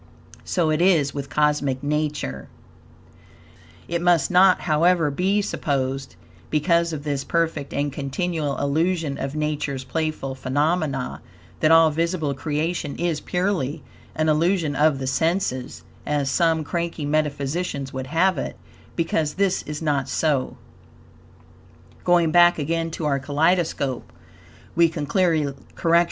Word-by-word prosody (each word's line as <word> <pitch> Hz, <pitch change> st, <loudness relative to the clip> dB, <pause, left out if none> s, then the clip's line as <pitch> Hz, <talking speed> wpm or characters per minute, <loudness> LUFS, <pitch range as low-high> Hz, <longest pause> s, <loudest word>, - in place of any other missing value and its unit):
So 165 Hz, -4 st, 0 dB
it 155 Hz, +2 st, +1 dB
is 165 Hz, -7 st, +3 dB
with 140 Hz, -1 st, -5 dB
Cosmic 145 Hz, -2 st, +1 dB
Nature. 145 Hz, -, -2 dB, 1.4 s
It 170 Hz, 0 st, -2 dB
must 175 Hz, -2 st, +3 dB
not, 185 Hz, +1 st, +5 dB
however, 165 Hz, -1 st, +2 dB
be 195 Hz, +7 st, +1 dB
supposed, 135 Hz, -5 st, -2 dB, 0.3 s
because 170 Hz, +2 st, +2 dB
of 150 Hz, -2 st, -5 dB
this 140 Hz, -2 st, -2 dB
perfect 165 Hz, -4 st, -1 dB
and 145 Hz, -1 st, -2 dB
continual 145 Hz, +1 st, -2 dB
illusion 160 Hz, 0 st, 0 dB
of 135 Hz, +2 st, -4 dB
Nature's 150 Hz, -3 st, -2 dB
playful 155 Hz, -2 st, -3 dB
phenomena, 140 Hz, -, -1 dB, 0.4 s
that 155 Hz, -, +3 dB
all 165 Hz, -1 st, +6 dB
visible 165 Hz, -2 st, -1 dB
creation 150 Hz, +1 st, -2 dB
is 170 Hz, -3 st, -1 dB
purely 175 Hz, -6 st, -1 dB, 0.3 s
an 155 Hz, 0 st, 0 dB
illusion 160 Hz, 0 st, +1 dB
of 150 Hz, 0 st, +3 dB
the 135 Hz, -, -4 dB
senses, 135 Hz, -1 st, -1 dB, 0.2 s
as 145 Hz, -2 st, -1 dB
some 165 Hz, -2 st, +2 dB
cranky 170 Hz, -1 st, -3 dB
metaphysicians 145 Hz, -1 st, -2 dB
would 130 Hz, 0 st, -4 dB
have 165 Hz, +2 st, +2 dB
it, -, -, -4 dB, 0.4 s
because 160 Hz, -2 st, 0 dB
this 195 Hz, -1 st, +1 dB
is 150 Hz, +1 st, -5 dB
not 140 Hz, -3 st, 0 dB
so. 145 Hz, -4 st, 0 dB
150 Hz, 105 wpm, -23 LUFS, 140-170 Hz, 1.4 s, all